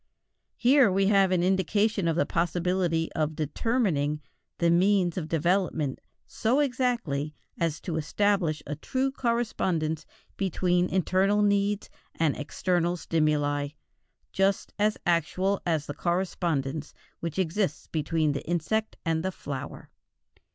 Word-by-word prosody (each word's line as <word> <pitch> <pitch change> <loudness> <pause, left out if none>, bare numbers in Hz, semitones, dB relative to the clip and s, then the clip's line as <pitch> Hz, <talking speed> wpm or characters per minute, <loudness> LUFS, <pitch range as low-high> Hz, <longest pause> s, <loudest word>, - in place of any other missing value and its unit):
Here 255 -3 +5
we 195 +1 +2
have 195 -2 +4
an 180 -2 +2
indication 195 +1 +1
of 165 - +1
the 175 - +2
possibility 175 -1 0
of 155 0 -1
determining 155 - 0 0.4
the 170 -1 +3
means 180 0 +3
of 165 -4 -3
development 165 -3 0 0.2
so 240 +5 0
exactly 240 - 0 0.2
as 165 -2 0
to 165 -3 -3
establish 170 -1 +1
a 150 - -4
true 260 - -1
correspondence 190 - -1 0.3
between 180 -1 +1
internal 190 +3 +2
needs 205 0 +1 0.3
and 160 -3 +1
external 175 +3 0
stimuli, 150 -3 +1 0.6
just 195 0 0
as 210 +1 +2
actual 180 +4 +1
as 160 -3 +1
the 145 - -5
correspondence 165 -5 -2 0.2
which 170 0 -4
exists 185 -2 -1
between 155 0 0
the 140 - -3
insect 195 +6 -1
and 165 -1 0
the 190 - -1
flower. 140 -6 -7
175 Hz, 125 wpm, -27 LUFS, 155-200 Hz, 0.6 s, Here